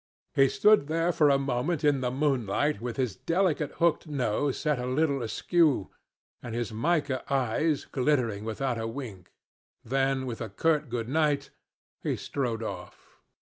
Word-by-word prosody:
He 135 -1 +5
stood 210 -5 +4
there 165 +2 +1
for 155 -4 +4
a 140 - +5
moment 140 +4 -1
in 145 -3 +3
the 125 - 0
moonlight 135 -2 0
with 120 +1 -4
his 125 -7 -1
delicate 165 - 0
hooked 170 0 +1
nose 140 -1 -1
set 150 -3 0
a 125 - -3
little 140 +1 +1
askew, 140 - +1 0.5
and 120 -2 -6
his 120 -3 -3
mica 145 +2 0
eyes 140 +4 +1
glittering 125 -7 0
without 115 +2 -2
a 115 - -2
wink, 115 -7 -8 0.5
then, 135 +1 0
with 120 -3 -5
a 110 - -4
curt 150 +6 +1
Good 115 -1 -3
night, 145 0 +1 0.5
he - - -1
strode 120 -5 -3
off. 90 -4 -8
135 Hz, 155 wpm, -28 LUFS, 120-150 Hz, 0.5 s, He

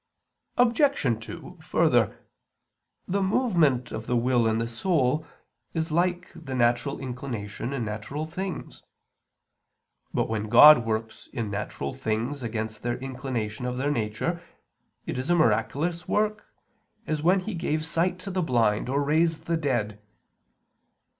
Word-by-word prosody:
Obj. 235 - +2
2: - - -9
Further, - - +2 0.9
the 200 +2 0
movement 175 - +2
of 110 0 -6
the 125 - +1
will 120 -1 +2
in 110 0 +1
the 115 +1 -1
soul 150 +3 0 0.5
is 160 0 -1
like 175 +2 0
the 155 -6 -7
natural 120 +3 +1
inclination 125 -4 -5
in 130 -5 -2
natural 110 +8 -4
things. 185 +3 -6 1.3
But - - 0
when 110 -1 -3
God 120 +1 +9
works 110 0 -3
in 110 -3 -3
natural 105 +5 -4
things 130 +2 -2
against 110 -2 -4
their 120 0 -2
inclination 125 -3 -4
of 125 0 -3
their 140 +3 0
nature, 130 +8 -2 0.6
it - - -3
is 130 - -4
a 175 - +5
miraculous 170 +1 +1
work, 215 0 0 0.6
as 155 -4 -1
when 185 +4 +4
He 215 +3 -5
gave 155 -2 -1
sight 170 +3 0
to 195 - -6
the 185 0 0
blind 115 -7 +1
or 140 +2 +1
raised 160 +2 +1
the 170 - 0
dead. 120 -9 -1
135 Hz, 140 wpm, -26 LUFS, 115-170 Hz, 1.3 s, God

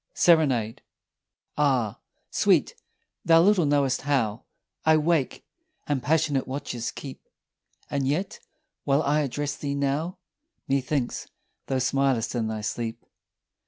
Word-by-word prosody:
SERENADE. 135 -10 +3 0.8
Ah, 130 -8 +1 0.3
sweet, - - +3 0.5
thou 165 0 +6
little 190 -5 +4
knowest 140 -3 +2
how 120 -6 0 0.4
I 160 0 +5
wake 155 -3 0 0.4
and 145 -3 -1
passionate 145 -1 +1
watches 130 -3 -4
keep; 135 -2 -9 0.7
And 140 -2 -1
yet 165 +8 -2 0.4
while 140 +2 +2
I 150 +2 +2
address 145 0 -2
thee 140 -1 -3
now, 140 +6 -1 0.5
Methinks 135 -1 -1 0.4
thou 135 - 0
smilest 130 -3 +1
in 115 -3 -1
thy 110 -1 -3
sleep. 115 +2 -4
140 Hz, 115 wpm, -26 LUFS, 125-150 Hz, 0.8 s, thou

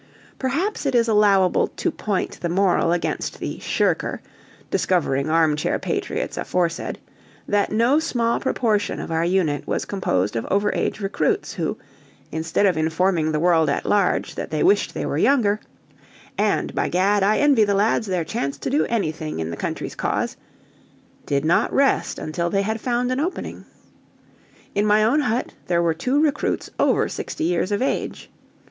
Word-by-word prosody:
Perhaps 290 +6 -1
it 265 - 0
is 235 -1 +3
allowable 200 -4 +4
to - - -2
point 205 -3 -3
the 175 - -1
moral 180 -2 +2
against 175 - -2
the - - -5
"shirker" - - 0 0.5
discovering 145 -5 +1
armchair 155 -2 +2
patriots - - -3
aforesaid: 170 -2 -1 0.5
that 205 -1 +1
no 235 +7 +3
small 235 -7 0
proportion 215 -6 0
of - - -6
our 165 0 +1
unit 170 -5 0
was - - -1
composed 105 - -1
of 115 - -1
over 200 +1 +1
age - - -2
recruits 400 - -1
who, - - -2 0.5
instead 160 +5 0
of 185 -5 +2
informing 160 0 +1
the 155 - 0
world 165 -2 +3
at 140 - -1
large 200 -3 +1
that - - -5
they - - 0
wished 390 +3 +2
they - - -2
were - - -1
younger, 215 -7 +3 0.8
"And, - - 0
by - - 0
Gad, 195 +3 +2
I 205 +2 +3
envy 280 -6 +4
the 200 -1 +1
lads 215 +2 +1
their 180 -3 -1
chance 140 -8 -3
to 195 - -4
do 290 - +2
anything 160 -8 -2
in 80 0 -3
the - - -4
country's - - -4
cause," - - -2 0.9
did 140 +1 0
not 165 - +2
rest 275 0 +2
until 170 +3 -2
they 195 +2 +1
had 220 +2 -2
found 245 0 0
an 255 - 0
opening. 345 +6 -4 1.1
In 205 +1 +1
my 210 +1 +4
own 235 +8 +3
hut 245 -4 -1
there 170 -1 +2
were 165 -1 +2
two 255 - 0
recruits 295 -2 0
over - - +3
sixty - - -5
years 175 +3 0
of 205 +4 +1
age. 270 - -3
200 Hz, 165 wpm, -22 LUFS, 165-230 Hz, 1.1 s, allowable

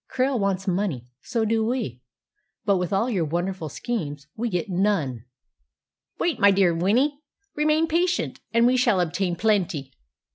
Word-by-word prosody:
Krail 260 -1 +1
wants 195 -1 -1
money, 180 - -1 0.2
so 230 -2 -1
do 220 0 +1
we; 220 - -2 0.6
but 205 - +2
even 190 - +1
with 180 +2 -2
all 200 +4 +1
your 200 -9 0
wonderful 175 +1 -2
schemes 145 - -4
we 235 +2 -2
get 180 +2 -2
none!" 175 - 0 0.9
"Wait, 340 - 0
my 200 - +7
dear 190 -3 +4
Winnie, 240 - +1 0.4
remain 305 +2 +2
patient, 345 +3 0
and 230 +1 +4
we 255 +1 +4
shall 240 -6 +3
obtain 175 +1 0
plenty." 180 -9 0
200 Hz, 155 wpm, -24 LUFS, 175-240 Hz, 0.9 s, my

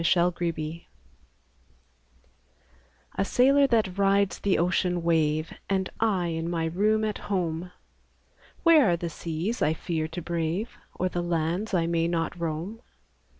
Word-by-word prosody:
THE - - -3
SAILOR 170 -2 0 2.3
A - - 0
sailor 275 +6 +4
that 210 -6 +1
rides 200 0 +2
the 200 - +1
ocean 175 0 +1
wave, 155 -1 +1 0.2
Am 190 -1 +1
I 195 -6 +1
in 165 0 -2
my 165 -2 -1
room 210 +6 +1
at 210 -1 -3
home: 180 -2 -1 0.9
Where 320 - +6
are 170 - +2
the 170 0 -4
seas 170 +9 -3
I 155 - +3
iear 160 -1 -3
to 165 +2 -5
brave. 170 +6 -2 0.2
Or 185 - 0
the 175 -1 -2
lands 175 +5 -1
I 170 -2 +2
may 165 0 +1
not 165 -1 -1
roam? 170 +7 -4
175 Hz, 140 wpm, -27 LUFS, 165-200 Hz, 2.3 s, Where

